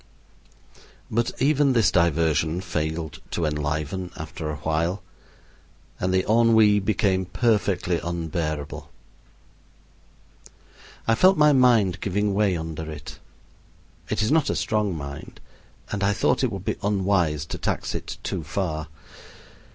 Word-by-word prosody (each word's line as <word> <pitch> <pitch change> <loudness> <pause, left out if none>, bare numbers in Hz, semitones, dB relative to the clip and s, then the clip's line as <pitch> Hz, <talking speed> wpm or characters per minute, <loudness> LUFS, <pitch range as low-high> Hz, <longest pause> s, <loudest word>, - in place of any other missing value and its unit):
But 115 +1 +1
even 140 0 +3
this 110 -7 +3
diversion 80 -1 +2
failed 80 -3 -3
to 85 - -1
enliven 75 +4 -2
after 75 - -6
awhile, 80 +6 -1 1.0
and 90 - 0
the 95 0 +1
ennui 110 -2 +5
became 95 -2 +1
perfectly 95 -3 +1
unbearable. 80 -3 -4 2.2
I 115 - +4
felt 185 +11 +5
my 150 -1 +6
mind 120 -8 +4
giving 100 +1 0
way 100 -3 +2
under 80 -1 -5
it. 75 -1 -9 0.9
It - - 0
is 110 - 0
not 155 -1 +3
a - - 0
strong 105 -5 0
mind, 70 +1 -8 0.5
and 100 -1 -2
I 100 +1 +3
thought 100 - +1
it 125 - +1
would 95 -2 -6
be - - -1
unwise 95 -7 +1
to - - -6
tax - - -2
it - - -5
too - - -3
far. 80 -5 -3
95 Hz, 125 wpm, -24 LUFS, 80-105 Hz, 2.2 s, my